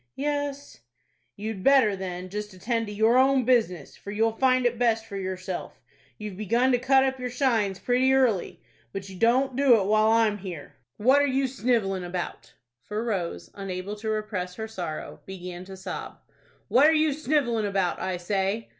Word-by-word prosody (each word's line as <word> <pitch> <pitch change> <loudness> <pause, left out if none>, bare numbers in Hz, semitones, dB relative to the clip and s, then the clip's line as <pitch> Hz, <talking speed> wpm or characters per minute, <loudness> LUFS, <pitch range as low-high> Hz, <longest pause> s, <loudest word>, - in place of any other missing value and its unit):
"Yes." 285 0 -3 0.6
"You'd 210 -2 -5
better, 265 -7 +5
then, 185 -1 -6
just 210 0 -6
attend 225 +4 -2
to - - -6
your 220 +4 +3
own 265 -1 +3
business, 230 -8 +1
for - - -11
you'll 220 +2 +1
find 255 0 +3
it 240 -1 +1
best 225 -2 +2
for 205 - -9
yourself. 185 -1 -5 0.4
You've 210 -3 -7
begun 235 +5 +2
to 245 - +3
cut 265 +1 +4
up 265 0 -1
your 250 0 -3
shines 230 -7 +1
pretty 250 +6 +2
early. 250 -8 +1 0.3
But 195 0 -6
you 190 - -9
don't 250 +6 +2
do 260 -4 +5
it 195 - -1
while 215 +2 +3
I'm 225 -2 +3
here. 180 -6 -8 0.2
What 260 +6 +4
are 285 - +2
you 270 0 +1
snivelling 230 -7 0
about?"—for 175 - -6
Rose, 195 -7 -3
unable 195 0 -5
to 220 +1 -4
repress 210 -4 -3
her 220 +2 -5
sorrow, 175 -8 -6
began 180 -1 -7
to 190 0 -10
sob. 185 -1 -6 0.5
"What 275 +4 +5
are 320 - +5
you 310 -1 +3
snivelling 270 -7 0
about, 195 -3 0
I 185 -1 -2
say?" 195 +4 -2
220 Hz, 175 wpm, -26 LUFS, 190-255 Hz, 0.6 s, better